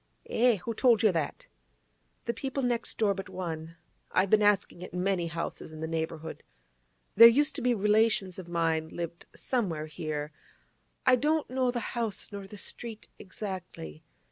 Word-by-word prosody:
'Eh? 245 0 +4
Who 210 +4 -4
told 235 -2 +4
you 215 - +6
that?' 165 -4 -2 0.8
'The 235 - 0
people 270 +1 -3
next 240 -1 0
door 210 -3 +3
but 195 0 -7
one. 165 -2 -5 0.4
I've 185 +1 +2
been 215 - +6
asking 200 -3 +2
at 180 - -8
many 180 -1 0
houses 165 -1 -5
in 155 - -9
the 160 - -2
neighbourhood. 160 0 -4 0.7
There 230 +3 +11
used 290 +6 +3
to - - -3
be 245 -1 +2
relations 210 -2 +2
of 180 - -8
mine 165 -2 0
lived 170 0 -6
somewhere 180 -12 -1
here; 155 -1 -4 0.7
I 255 0 +6
don't 300 +1 +1
know 255 -1 +1
the 245 -1 -3
house, 225 -5 -2
nor 200 -1 -7
the 210 - -10
street 225 +2 -7
exactly. 185 - -7
195 Hz, 165 wpm, -29 LUFS, 165-235 Hz, 0.8 s, There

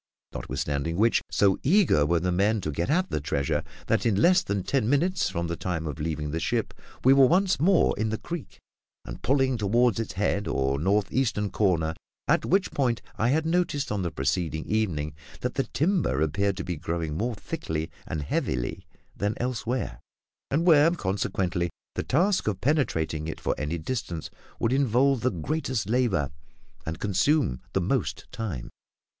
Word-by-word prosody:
Notwithstanding 75 +3 -2
which, 115 +3 +3
so 100 -2 +3
eager 150 - +4
were 85 +1 +2
the 90 +2 0
men 100 +5 +2
to 75 - -2
get 85 - -2
at 180 +5 +1
the 75 - -1
treasure, 70 -1 -1 0.2
that - - +1
in 105 -4 +2
less 180 - +5
than 100 - -2
ten 125 -1 0
minutes 175 +7 +2
from 85 -2 -2
the 85 0 -2
time 85 -2 -3
of 75 -4 -5
leaving 75 -1 -2
the 80 - -1
ship - - -1 0.3
we 130 - +7
were 135 -1 +7
once 185 +2 +3
more 175 +3 +4
in 110 0 +1
the 110 - -1
creek, 170 +2 -7 0.5
and - - -8
pulling 130 -2 +2
toward 115 +2 +2
its 115 - -3
head 100 +1 0
or 65 +1 0
north 100 +5 +1
eastern 110 -6 0
corner, 85 -6 +1 0.3
at - - +3
which 190 +1 +2
point 125 -5 0
I 110 - +2
had 155 +4 +2
noticed 165 -6 0
on 105 -2 -1
the 90 - -1
preceding 80 +2 -1
evening 85 -9 -1 0.3
that 125 - -2
the 135 - 0
timber 165 - +1
appeared 95 +6 +1
to - - -3
be 90 -2 -3
growing 80 -1 -3
more 115 +7 -1
thickly 80 -4 -4 0.2
and 75 -2 -3
heavily 65 -3 -2 0.3
than 105 +2 -1
elsewhere, 125 - -2 0.5
and 155 +5 +1
where, 160 -2 +7
consequently, 95 - -1 0.2
the - - -2
task 185 - +1
of 100 -4 0
penetrating 80 - 0
it 80 - -5
for - - 0
any 75 +3 -2
distance 85 -2 -4 0.3
would 115 - +1
involve 135 0 +3
the 130 - +2
greatest 130 - -2
labour 110 - +1 0.6
and 80 0 -4
consume 105 - +1
the - - +1
most - - -1
time. 85 - -5
105 Hz, 175 wpm, -27 LUFS, 80-135 Hz, 0.6 s, we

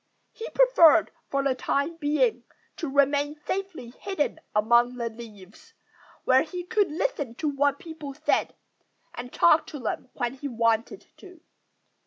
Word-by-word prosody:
He 455 - -8
preferred, 340 - +5 0.2
for 275 0 0
the 275 -1 +2
time 280 +5 -2
being, 305 +10 +1 0.3
to 320 - -4
remain 285 +1 +2
safely 375 -11 -4
hidden 375 -5 -2 0.2
among 235 +3 +3
the 235 -1 -3
leaves, 220 - -14 0.5
where 260 0 +4
he 355 +3 -5
could 410 +2 +1
listen 300 - -2
to 305 - -3
what 285 0 +1
people 310 -5 -9
said 310 +2 0 0.6
and 245 0 -8
talk 325 -2 +4
to 295 - -8
them 245 +1 -4
when 245 -1 -2
he 270 +2 -6
wanted 230 -2 0
to. 365 -4 -15
285 Hz, 145 wpm, -26 LUFS, 245-335 Hz, 0.6 s, preferred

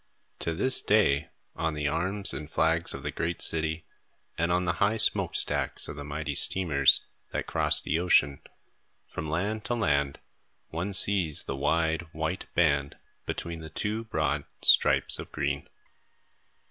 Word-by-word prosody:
To 85 - -2
this 130 +8 +2
day, 85 -7 +2 0.3
on 80 -1 -2
the 75 -1 -1
arms 95 +7 0
and 75 0 -7
flags 80 +1 0
of - - -9
the - - -3
great 85 0 -3
city, 80 0 0 0.5
and 85 +1 -1
on 90 +1 +1
the 85 - 0
high 105 +3 +2
smoke - - +2
stacks - - +1
of - - -7
the 70 - -7
mighty 75 +1 -4
steamers 75 -4 +4 0.2
that - - -4
cross - - +1
the 80 - -1
ocean, 70 -6 +2 0.7
from 75 - -6
land 100 +7 -2
to 120 - -1
land, 70 -10 0 0.5
one 85 +5 -4
sees 95 -6 +2
the 70 - -5
wide, 80 +3 0
white 80 +4 -4
band 70 -4 +1 0.3
between 85 -1 -4
the 80 -1 -9
two 105 +7 -3
broad 75 -8 -2 0.2
stripes - - +4
of - - -8
green. 70 0 -3
80 Hz, 155 wpm, -27 LUFS, 75-90 Hz, 0.7 s, steamers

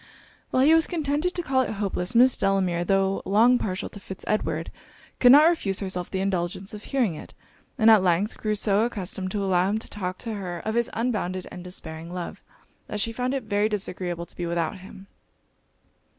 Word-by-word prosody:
While 255 - +2
he 305 +3 +6
was 325 0 +4
contented 315 +1 -1
to 350 - -2
call 260 -3 +2
it 255 - -2
hopeless, 195 0 -2
Miss 250 +2 +6
Delamere, 190 -3 +1
tho' 195 +1 +1
long 235 +5 +4
partial 185 -2 -3
to 205 - -11
Fitz 190 -1 -9
Edward, 165 -6 -1 0.5
could 245 - +7
not 295 +4 +8
refuse 205 - +1
herself 185 -3 -3
the 190 - -2
indulgence 190 0 -2
of 210 0 -9
hearing 245 -10 0
it; 150 - -11 0.4
and 225 -2 +6
at 215 -3 +7
length 185 +3 +1
grew 215 -1 -1
so 205 0 +2
accustomed 190 -5 -3
to 200 +1 -2
allow 185 -1 +2
him 210 - 0
to 220 - -5
talk 185 -3 -4
to 230 +2 -5
her 185 -4 -5
of 220 - -3
his 235 0 +1
unbounded 210 -6 -2
and 180 - -8
despairing 165 -2 -8
love, 180 -1 -6 0.5
that 210 - -4
she 230 +3 +1
found 250 +3 -1
it 270 - -3
very 210 0 +1
disagreeable 180 -4 -3
to - - -14
be 175 - -3
without 170 +2 -2
him. 190 +1 -12
200 Hz, 200 wpm, -25 LUFS, 180-230 Hz, 0.5 s, not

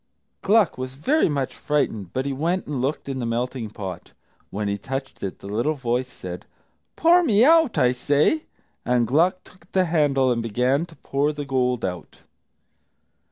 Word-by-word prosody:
Gluck 205 - +3
was 130 0 -5
very 270 - +2
much 140 -3 -2
frightened, 110 - -1
but 130 +1 -2
he 140 - -1
went 170 +7 -1
and 140 -4 -3
looked 140 +3 -2
in 135 -1 -3
the 120 - -2
melting 120 0 -2
pot. 95 -4 -8 0.4
When 105 +1 -3
he 100 - 0
touched 135 +6 -6
it, 95 - -4
the - - -11
little 120 +10 0
voice 125 -1 -1
said, 90 -7 -9 0.5
"Pour 345 +2 +5
me 230 -8 +4
out, 325 -3 +5
I 125 -1 +4
say!" 145 - +1 0.4
And 125 -1 +2
Gluck 175 - +2
took 180 0 -21
the 185 -1 +3
handle 145 -6 +2
and 120 -1 0
began 125 +8 0
to 165 - -16
pour 140 +1 -1
the 145 -1 -6
gold 125 -4 0
out. 90 -3 -6
135 Hz, 175 wpm, -23 LUFS, 120-160 Hz, 0.5 s, Pour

